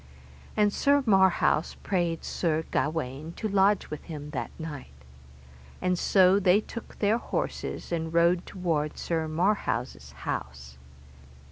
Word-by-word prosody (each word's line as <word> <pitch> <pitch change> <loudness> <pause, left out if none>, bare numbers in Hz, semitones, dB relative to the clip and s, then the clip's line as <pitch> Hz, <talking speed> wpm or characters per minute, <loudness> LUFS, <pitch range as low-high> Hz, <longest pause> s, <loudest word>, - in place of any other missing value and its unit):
And 210 -1 +3
Sir 285 0 +3
Marhaus 190 -6 +3
prayed 175 -4 -1
Sir 160 -2 -1
Gawaine 155 0 -2
to 215 - -3
lodge 200 0 +2
with 150 - -6
him 150 -3 -7
that 125 -6 -3
night. 145 - -8 0.8
And 180 0 +1
so 185 +2 +4
they 190 0 +4
took 230 +1 -9
their 215 +3 +2
horses, - - -4
and 165 -1 -2
rode 170 +1 +3
toward 165 -5 -2
Sir 160 -2 -1
Marhaus' 180 +7 -1
house. 65 0 -6
170 Hz, 125 wpm, -27 LUFS, 155-195 Hz, 0.8 s, so